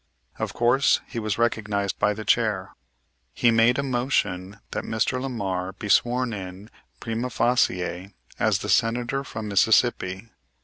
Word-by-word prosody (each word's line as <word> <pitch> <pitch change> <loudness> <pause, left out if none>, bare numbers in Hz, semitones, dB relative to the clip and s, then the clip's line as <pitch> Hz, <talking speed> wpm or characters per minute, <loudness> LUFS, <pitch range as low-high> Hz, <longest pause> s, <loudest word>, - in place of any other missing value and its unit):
Of - - -3
course 120 +3 +3
he 120 - -5
was 110 -3 -2
recognized 105 -4 -1
by 105 0 +2
the 110 0 -7
chair. 105 -3 +1 0.6
He 120 - +4
made 115 +2 +4
a 140 - 0
motion 105 -7 -1
that - - -3
Mr. 115 +3 -1
Lamar 95 -8 -3
be 100 +2 -7
sworn 120 +2 +2
in 95 +1 -8 0.3
prima 115 +2 -3
facie 95 -7 0 0.3
as - - +2
the - - -4
Senator 120 +4 +1
from 110 -5 -6
Mississippi. 100 0 +2
110 Hz, 140 wpm, -24 LUFS, 100-120 Hz, 0.6 s, He